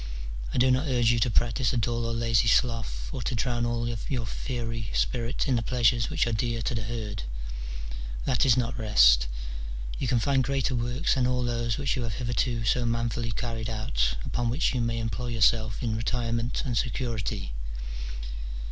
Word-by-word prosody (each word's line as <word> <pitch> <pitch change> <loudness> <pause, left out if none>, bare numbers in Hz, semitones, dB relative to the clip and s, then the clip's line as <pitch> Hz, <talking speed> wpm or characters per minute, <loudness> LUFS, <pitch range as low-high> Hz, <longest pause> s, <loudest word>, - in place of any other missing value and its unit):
I - - -3
do 130 +1 +5
not 130 +4 +2
urge 120 -4 +3
you 120 - +2
to 120 - +2
practise 120 +2 +2
a - - +1
dull 115 +1 0
or 115 - -1
lazy 115 -1 +2
sloth, 110 - +1
or - - -3
to - - -1
drown 120 0 0
all 120 0 -1
your 120 +1 -2
fiery 115 -1 -4
spirit 120 +5 0
in 130 - +3
the 115 - +1
pleasures 115 -1 +2
which - - +2
are 120 - -1
dear 115 +1 -1
to - - 0
the 110 - -1
herd: 105 -3 -4 1.0
that - - +2
is 130 -3 +5
not 125 0 -1
rest: - - +6 0.7
you - - -1
can 125 - +3
find 135 +3 +2
greater 135 0 0
works 120 +6 +1
than 130 -2 +2
all 125 0 +1
those 120 -1 0
which 140 -2 0
you 130 - -2
have 115 -3 -3
hitherto 120 -1 0
so 125 +3 +2
manfully 115 0 -1
carried 115 -1 -3
out, - - 0
upon 120 -1 -1
which 135 +6 +1
you 125 - 0
may 115 0 0
employ 115 +2 -2
yourself 110 -1 +2
in 110 -2 0
retirement 115 +1 -1
and 120 -5 +1
security. 115 - -2
115 Hz, 185 wpm, -28 LUFS, 115-125 Hz, 1.0 s, rest